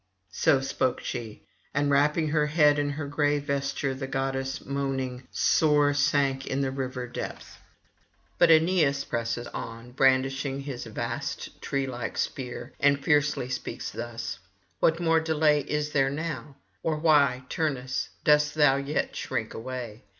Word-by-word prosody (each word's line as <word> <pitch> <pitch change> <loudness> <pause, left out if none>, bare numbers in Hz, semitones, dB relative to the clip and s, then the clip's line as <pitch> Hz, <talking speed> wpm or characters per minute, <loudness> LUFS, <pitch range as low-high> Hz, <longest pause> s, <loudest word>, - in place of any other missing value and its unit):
So 135 +6 +3
spoke 130 -1 -1
she, 115 -3 -6 0.3
and 145 0 +2
wrapping 150 +3 +3
her 150 0 +2
head 150 -1 +4
in 145 0 0
her 145 +1 -4
gray 145 +1 +1
vesture, 140 -1 -2
the 135 0 -5
goddess 135 0 -2
moaning 135 -2 -3
sore 150 -2 +3
sank 140 -2 +1
in 135 +1 -1
the 135 -1 0
river 130 -2 -4
depth. 125 - -7 0.8
But 175 - +6
Aeneas 160 -4 +4
presses 120 0 -2
on, 115 +2 -7
brandishing 135 +1 +2
his 135 -4 -6
vast 115 +2 -5
tree 135 -1 -1
like 120 -3 -5
spear, 125 -1 -4
and 140 0 +4
fiercely 150 -5 +2
speaks 125 0 -4
thus: 120 0 -5 0.4
'What 165 - +3
more 165 -1 +3
delay 155 -2 +3
is 150 +1 -2
there 135 -2 +3
[889 155 +3 -2
924]now? 145 -2 -17 0.3
or 160 -1 0
why, 145 -5 +3
Turnus, 130 -5 -2
dost 150 0 +4
thou 145 -3 +5
yet 140 +2 -2
shrink - - -3
away? 120 -1 -6
140 Hz, 145 wpm, -27 LUFS, 130-150 Hz, 0.8 s, But